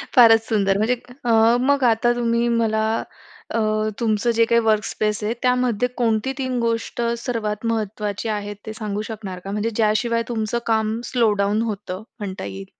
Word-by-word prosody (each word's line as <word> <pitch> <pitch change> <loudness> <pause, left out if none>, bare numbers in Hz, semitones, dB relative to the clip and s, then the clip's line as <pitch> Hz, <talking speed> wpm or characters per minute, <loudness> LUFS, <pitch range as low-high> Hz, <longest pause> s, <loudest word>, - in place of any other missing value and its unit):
फारच 225 -3 +8
सुंदर 195 -3 +2
म्हणजे. 220 +4 +2 0.3
अ, 235 - +2 0.3
मग 280 +1 +2
आता 235 +2 +2
तुम्ही 235 0 +1
मला 225 -2 +1 0.7
अ, 230 - +1 0.4
तुमचं 225 0 +1
जे 230 0 +4
काही 235 +1 +3
वर्कस्पेस 215 0 0
आहे, 215 +2 0
त्यामध्ये 250 -2 +2
कोणती 230 +1 +1
3 255 -2 -2
गोष्ट 230 +1 -1 0.2
सर्वात 220 -3 -2
महत्वाची 210 -1 -3
आहे 205 -1 -3
ते 220 - -5
सांगू 210 -2 -4
शकणार 200 -4 -6
का? 195 +2 -7
म्हणजे 210 +2 -1
ज्या 215 -1 +3
शिवाय 230 +1 0
तुमचं 230 0 -1
काम 220 0 +1
स्लो 235 -4 +3
डाउन 205 +2 +1
होतं 205 -4 -4 0.2
म्हणता 195 -2 -5
येईल. 95 -1 -7
220 Hz, 165 wpm, -22 LUFS, 210-235 Hz, 0.7 s, फारच